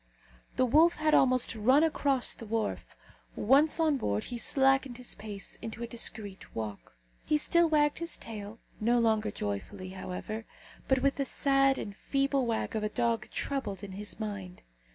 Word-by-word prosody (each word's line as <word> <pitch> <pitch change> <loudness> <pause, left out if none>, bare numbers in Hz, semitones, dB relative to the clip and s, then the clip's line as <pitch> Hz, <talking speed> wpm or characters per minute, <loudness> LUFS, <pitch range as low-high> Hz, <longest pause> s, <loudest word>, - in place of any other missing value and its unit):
The 255 - +3
wolf 315 +7 +5
had 310 0 +1
almost 255 -2 +4
run 255 +7 +4
across 280 -5 +2
the 230 - -7
wharf; 225 0 -3 0.4
once 285 +8 +4
on 310 -3 +3
board, 105 - -1
he 245 - -5
slackened 270 -1 +2
his 250 -1 -4
pace 205 -2 -7
into 230 +1 -6
a - - -4
discreet 215 -4 -5
walk. 105 - -6 0.3
He 305 - +2
still 340 +2 +3
wagged 295 -1 +2
his 335 0 -2
tail 215 -1 -8 0.2
no 235 +3 +2
longer 220 -2 +2
joyfully, 185 - -5
however, 190 +4 -6 0.4
but 265 -1 +2
with 275 0 +2
the 275 - 0
sad 275 0 +2
and 200 - -6
feeble 275 +1 0
wag 225 0 -2
of 220 - 0
a 210 - -1
dog 230 -1 -1
troubled 215 -9 -3
in 200 - -7
his 205 +3 -7
mind. 200 -4 -6
235 Hz, 170 wpm, -30 LUFS, 210-275 Hz, 0.4 s, wolf